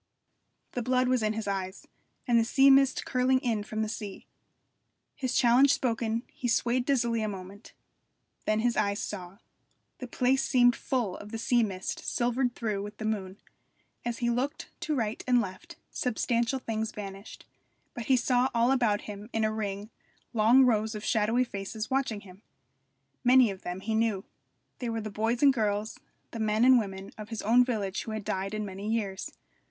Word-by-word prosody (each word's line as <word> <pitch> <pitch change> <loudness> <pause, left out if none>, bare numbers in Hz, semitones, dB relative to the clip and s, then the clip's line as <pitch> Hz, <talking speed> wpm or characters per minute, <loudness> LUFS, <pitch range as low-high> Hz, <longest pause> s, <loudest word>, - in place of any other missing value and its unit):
The 245 - -3
blood 255 +1 +2
was 255 -2 +2
in 215 0 +1
his 220 -1 -4
eyes, 190 -1 -4 0.4
and 235 -1 +4
the - - +3
sea 270 +4 +5
mist 270 0 +4
curling 255 0 +2
in 230 -5 0
from 215 +1 -3
sea. 210 -2 -6 0.9
His 260 -3 -3
challenge 255 +3 +5
spoken, 230 -2 -1
he 250 - -3
swayed 245 +1 +1
dizzily 235 -5 +1
a 215 - -1
moment. 195 +1 -9 0.7
Then 215 0 +1
his 240 0 +1
eyes 200 -1 0
saw. 185 -2 -6 0.6
The 255 - -6
place 255 +2 +1
seemed 245 -2 +4
full 240 -9 -2
of 205 0 -10
the 225 - -3
sea 240 +2 +2
mist 190 -4 -3
silvered 245 +1 0
through 215 -4 -2
with 205 +1 -8
the 220 - -5
moon. 200 -3 -3 0.7
As 235 -1 -3
he 235 -1 0
looked 265 +5 -3
to 305 - -2
right 225 -4 -2
and 250 -1 +5
left 190 -5 -6 0.2
substantial 235 +1 0
things 220 -3 -3
vanished, 195 0 -9 0.5
but 240 -3 -6
he 260 - +5
saw 250 +1 +2
all 235 +2 +3
about 230 -6 +2
him 205 +1 -8
in 225 - +1
a 215 0 +1
ring 205 0 -4 0.4
long 230 +4 +6
rows 220 -3 +2
of 210 - -6
shadowy 225 +3 +2
faces 215 0 -5
watching 260 -6 0
him. 190 0 -15 0.8
Many 250 -3 +6
of 190 - -9
them 180 +1 -5
he 220 +3 -2
knew. 220 -3 0 0.5
They 245 - -3
were 225 -1 -2
the 215 0 -6
boys 225 +5 0
and 275 -1 +7
girls, 215 -2 -1 0.3
the 230 - -6
men 215 +1 +2
and 255 -1 +7
women, 195 -2 -6
of 210 0 -7
his 225 -2 -5
own 235 +4 +5
village 210 -6 -2
who 220 - -6
had 215 -2 -5
died 195 +2 -2
in 215 0 -2
many 200 +2 -5
years. 200 -4 -2
225 Hz, 180 wpm, -29 LUFS, 205-245 Hz, 0.9 s, and